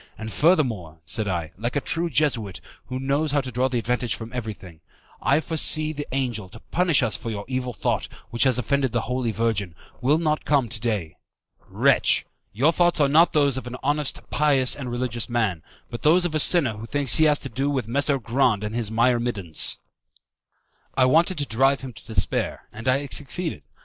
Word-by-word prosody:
And, 110 0 -6
furthermore," 120 - +1
said 110 +3 -2
I, 85 -4 -3
like 120 +4 -3
a - - +3
true 170 +4 -1
Jesuit, 120 - 0 0.3
who 130 0 -4
knows 140 +3 0
how 145 - +3
to 130 -1 -7
draw 125 +2 0
advantage 125 -1 -1
from 115 +1 -9
everything, 105 -8 -7 0.4
"I 140 - +3
foresee 155 -1 +2
that 145 -1 -6
the - - -5
angel, 115 -8 -3
to - - -12
punish 170 -6 +1
us 110 -5 +1
for 115 - -5
your 100 -2 -5
evil 130 -1 -3
thought, 110 - -2 0.2
which 115 - -4
has 130 -3 +3
offended 130 +1 0
the 120 - +1
Holy 125 -1 -2
Virgin, 105 -6 -1 0.3
will 145 +5 +3
not 155 -2 0
come 140 -6 +1
to 105 -2 -1
day. 105 -9 -2 0.5
Wretch, - - +3 0.3
your 130 +11 +3
thoughts 175 0 +2
are 145 - +4
not 160 +4 +4
those 140 -3 +2
of 130 - -6
an 125 - -6
honest, 145 +1 -1
pious, 140 -4 +2
and 130 -3 -6
religious 120 -1 -3
man, 110 -9 0 0.3
but 120 - -6
those 175 +4 +4
of 170 - -2
a 155 - +1
sinner 140 - +4
who 110 +2 -8
thinks 145 0 +2
he 160 - +5
has 150 -1 +3
to 135 - -5
do 135 +2 -1
with 130 -6 -2
Messer 140 +3 +1
Grande 115 -3 +1
and 105 +1 -4
his 115 -3 -1
myrmidons." 115 -7 +1 1.2
I 130 - +5
wanted 165 +7 +3
to 145 - +1
drive 135 +4 +2
him 130 -2 -8
to 100 - -15
despair, 110 - -1
and 115 +4 -8
I 130 +2 +3
had 140 - -6
succeeded. 155 - -2
130 Hz, 200 wpm, -24 LUFS, 115-145 Hz, 1.2 s, he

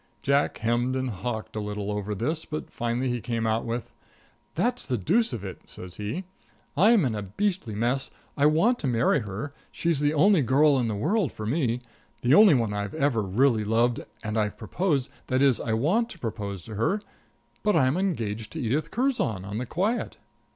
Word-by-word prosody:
Jack 140 +1 +2
hemmed 120 +3 0
and 130 -1 -1
hawked 110 +3 -5
a - - -1
little 105 -1 -3
over 105 0 -3
this, 155 - -2
but 155 -1 -6
finally 120 +2 -1
he 120 -1 -1
came 115 -1 -2
out 110 +1 0
with 115 0 -3
it: - - -30 0.6
"That's 245 +1 0
the 125 -3 -1
deuce 220 - +2
of 115 -6 -5
it," 95 -2 -7
says 90 -1 -10
he. 105 - -3 0.5
"I'm 205 +2 +5
in 120 - 0
a 105 - -3
beastly 155 - -2
mess 120 +5 0 0.3
I 145 +1 +4
want 170 +11 +3
to 140 - -2
marry 120 +4 +3
her 105 +6 -5 0.2
she's 170 -4 0
the 145 +1 +1
only 190 +3 +5
girl 140 +2 +4
in 120 - 0
the 110 - -2
world 185 - +1
for 110 - -7
me 125 -1 0 0.4
the 125 +3 +4
only 200 -2 +8
one 115 -4 0
I've 100 +5 -3
ever 140 -7 +1
really 110 +4 +2
loved, 115 +3 +1 0.2
and 110 0 -1
I've 105 -1 -1
proposed 140 - -1 0.2
that 130 +1 +2
is, 135 -4 +4
I 115 - -2
want 180 - +2
to - - -10
propose 105 - -5
to 110 - -9
her, 115 - +1 0.6
but 210 -1 +2
I'm 130 +2 +3
engaged 115 - -2
to - - -5
Edith 130 +7 -1
Curzon 235 - 0
on 105 +3 -4
the 125 - -4
quiet." 205 - -1
125 Hz, 200 wpm, -26 LUFS, 110-155 Hz, 0.6 s, only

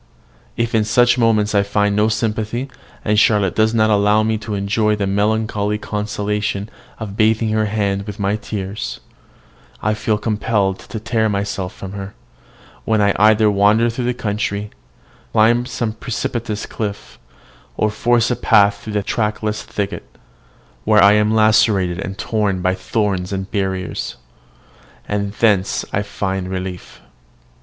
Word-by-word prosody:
If 115 0 -1
in 110 -1 +3
such 120 +3 +3
moments 110 -3 +2
I 100 - +4
find 100 0 +1
no 105 +1 +3
sympathy, 110 +3 -2 0.3
and 105 -1 +3
Charlotte 105 -4 +3
does 110 0 +3
not 110 -1 +2
allow 105 +1 +3
me 110 0 0
to 105 -1 -4
enjoy 105 +2 +1
the 105 -1 -1
melancholy 105 +1 0
consolation 105 0 -3 0.3
of 105 -3 -6
bathing 110 0 +2
her 110 0 +1
hand 100 -1 -1
with 105 0 -6
my 100 +1 +1
tears, 105 -2 -5 0.8
I 110 - 0
feel 105 0 0
compelled 105 -3 0
to 110 - -7
tear 110 -1 0
myself 100 -2 -3
from 95 - -8
her, 100 0 -7 0.7
when 110 -1 +1
I 100 -1 +3
either 105 0 +5
wander 105 +4 +3
through 120 +1 -3
the 125 0 0
country, 105 -2 -3 0.6
climb 120 +2 +3
some 120 -3 -2
precipitous 115 -2 -3
cliff, 100 - -6 0.6
or 105 - +1
force 120 +2 +2
a - - +1
path 100 -3 +3
through 105 +1 -7
the 105 -1 0
trackless 105 0 -1
thicket, 100 -1 -5 0.7
where 105 -2 +5
I 100 +1 +7
am 105 0 +3
lacerated 110 -5 +3
and 95 0 -5
torn 100 -5 -1
by 95 0 +2
thorns 95 -2 -1
and 95 0 -4
briers; 95 -2 -3 0.9
and 100 -1 -2
thence 105 -3 +1
I 100 - +1
find 95 -2 -3
relief. 95 -1 -6
105 Hz, 150 wpm, -19 LUFS, 100-110 Hz, 0.9 s, I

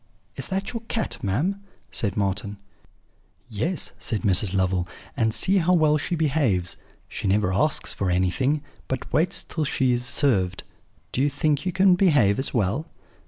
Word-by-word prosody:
"'Is - - -3
that 195 +3 -3
your 230 - -4
cat, 225 - -3
ma'am?' 155 - -1 0.3
said 100 -4 -2
Marten. 100 +1 -2 0.9
"'Yes,' 145 - -2
said 110 -3 -2
Mrs. 95 -1 +4
Lovel; 95 -2 +1 0.3
'and 115 -5 +1
see 190 - +4
how 180 0 +3
well 155 -3 +3
she 175 - -2
behaves: 135 - 0 0.3
she - - -4
never 95 -1 +2
asks 150 +10 +1
for 95 - -2
anything, 130 +12 +1 0.2
but 130 -1 -5
waits 165 +4 +1
till 160 - -3
she 130 -3 +1
is 120 0 -1
served. 115 -8 +1 0.5
Do 130 - -1
you 145 - +3
think 145 +3 0
you - - +1
can 190 0 +4
behave 145 - +3
as 135 - -1
well?' 120 - 0
130 Hz, 165 wpm, -24 LUFS, 100-160 Hz, 0.9 s, Mrs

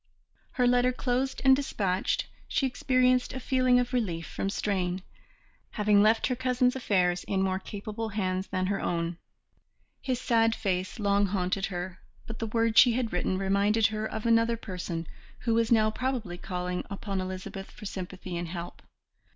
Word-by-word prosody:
Her 250 - +2
letter 245 0 +4
closed 255 +1 -1
and 265 0 +8
dispatched, 195 -9 -1 0.2
she 270 - 0
experienced 255 -1 +2
a 260 - -4
feeling 255 -1 +3
of 245 +1 -2
relief 175 -9 -1
from 195 - -3
strain, 185 -3 -1 0.7
having 210 -1 +4
left 220 +2 +4
her 250 - 0
cousin's 250 0 +1
affairs 180 -8 +1
in 190 -1 0
more 190 0 0
capable 215 +3 -5
hands 190 -2 -2
than 185 0 -1
her 195 +1 -1
own. 170 0 -2 0.8
His 255 -3 -1
sad 225 -2 +2
face 185 0 -2
long 200 -1 +2
haunted 190 0 -1
her, 180 -1 -5 0.3
but 225 0 -7
the 225 - -2
words 225 0 +3
she 245 - +7
had 235 -3 -1
written 180 +1 0
reminded 200 +3 +2
her 215 0 -2
of 220 0 -5
another 230 0 +3
person 180 -5 -5 0.4
who 230 - +1
was 230 0 +2
now 215 -2 +4
probably 240 -7 -2
calling 180 -1 -3
upon 200 -1 -3
Elizabeth 185 +1 -6
for - - -12
sympathy 185 -2 -6
and 170 0 -3
help. 175 +1 -7
210 Hz, 165 wpm, -28 LUFS, 185-240 Hz, 0.8 s, and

